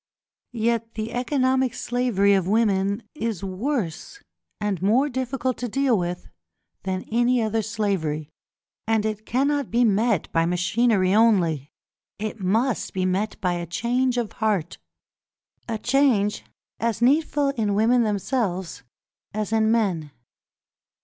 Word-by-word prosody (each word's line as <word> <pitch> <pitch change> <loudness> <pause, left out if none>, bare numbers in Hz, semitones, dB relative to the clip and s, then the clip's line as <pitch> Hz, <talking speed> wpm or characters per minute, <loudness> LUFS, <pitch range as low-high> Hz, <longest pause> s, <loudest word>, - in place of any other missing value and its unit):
Yet 230 0 -1
the 220 +1 -4
economic 260 0 +1
slavery 235 -5 +1
of 190 -3 +1
women 200 -1 +1
is 225 - -3
worse 200 - -3 0.4
and 205 -4 -2
more 240 +9 +3
difficult 260 0 -2
to 245 - -2
deal 270 +1 +2
with 175 -2 -3 0.5
than 185 -1 -3
any 240 +2 +3
other 220 0 0
slavery, 195 -9 -2 0.6
and 220 -1 +1
it 215 0 -4
cannot 280 +1 0
be 240 +2 +2
met 215 -3 +2
by 165 0 +2
machinery 185 +2 +2
only; 175 - +3 0.5
it 215 +1 -5
must 220 +7 0
be 185 -1 0
met 195 +3 -1
by 180 -2 +1
a 175 -1 -4
change 245 +7 0
of 235 -3 -1
heart, 205 -7 -1 0.9
a 225 - -1
change 245 -4 +2 0.3
as 230 0 -1
needful 290 +1 +3
in 215 -7 -1
women 235 +4 +3
themselves 205 - -1 0.5
as 215 0 -2
in 220 0 +3
men. 190 -10 0
220 Hz, 130 wpm, -24 LUFS, 195-245 Hz, 0.9 s, more